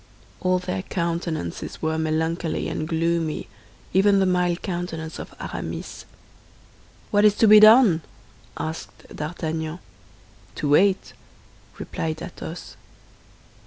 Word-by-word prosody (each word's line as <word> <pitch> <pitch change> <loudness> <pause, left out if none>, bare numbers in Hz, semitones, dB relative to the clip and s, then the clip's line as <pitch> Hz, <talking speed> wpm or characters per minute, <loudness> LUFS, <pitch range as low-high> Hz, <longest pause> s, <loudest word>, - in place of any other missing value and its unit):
All 185 0 +2
their 180 +1 -3
countenances 170 - -3
were 160 0 -1
melancholy 160 +1 -1
and 155 - -3
gloomy, 165 -1 -1 0.5
even 200 +1 +5
the 190 - +3
mild 180 -1 +1
countenance 170 -3 -4
of - - -8
Aramis. - - -6 1.1
"What 205 0 +4
is 210 -1 +5
to 225 - +4
be 210 0 +9
done?" 215 -5 +7 0.6
asked 160 +1 -7
D'Artagnan. 160 0 -4 0.8
"To 145 - -2
wait!" 190 +6 +3 0.6
replied 160 -1 -4
Athos. 170 -1 -8
170 Hz, 105 wpm, -24 LUFS, 160-185 Hz, 1.1 s, be